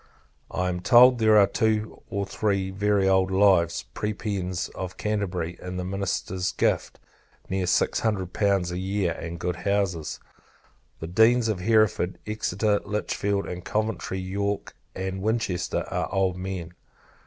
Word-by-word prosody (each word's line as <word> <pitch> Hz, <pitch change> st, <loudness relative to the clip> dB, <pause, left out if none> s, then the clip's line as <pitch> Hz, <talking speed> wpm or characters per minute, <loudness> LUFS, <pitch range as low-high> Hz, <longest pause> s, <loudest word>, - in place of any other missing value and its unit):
I 90 Hz, 0 st, -1 dB
am 90 Hz, 0 st, -2 dB
told, 120 Hz, +6 st, +6 dB
there 110 Hz, -1 st, +5 dB
are 100 Hz, -, +7 dB
two 110 Hz, +2 st, -1 dB
or 100 Hz, 0 st, -2 dB
three 100 Hz, -1 st, -1 dB
very 100 Hz, 0 st, +1 dB
old 95 Hz, -1 st, +3 dB
lives, 95 Hz, -3 st, +3 dB
Prebends 100 Hz, -4 st, -3 dB
of 90 Hz, -1 st, -7 dB
Canterbury, 90 Hz, -5 st, -2 dB
in 90 Hz, 0 st, -5 dB
the 90 Hz, -, -2 dB
Minister's 95 Hz, -1 st, -2 dB
gift -, -, 0 dB, 0.5 s
near 95 Hz, -1 st, -1 dB
six 90 Hz, -, +2 dB
hundred 100 Hz, -5 st, -1 dB
pounds 100 Hz, -4 st, +1 dB
a 90 Hz, -, -3 dB
year, 95 Hz, -1 st, 0 dB
and 85 Hz, +1 st, -6 dB
good 90 Hz, +1 st, -2 dB
houses. 95 Hz, -4 st, -1 dB, 0.8 s
The 80 Hz, -, -4 dB
Deans 115 Hz, +6 st, +4 dB
of 105 Hz, -4 st, -1 dB
Hereford, 110 Hz, -3 st, +2 dB
Exeter, 105 Hz, -1 st, 0 dB
Litchfield 100 Hz, -1 st, -1 dB
and 90 Hz, 0 st, -6 dB
Coventry, 105 Hz, -2 st, -2 dB
York, 100 Hz, +2 st, -3 dB, 0.2 s
and 95 Hz, 0 st, -4 dB
Winchester, 110 Hz, -4 st, -1 dB
are -, -, -2 dB
old 95 Hz, -1 st, +1 dB
men. 90 Hz, -2 st, -5 dB
95 Hz, 140 wpm, -26 LUFS, 90-105 Hz, 0.8 s, are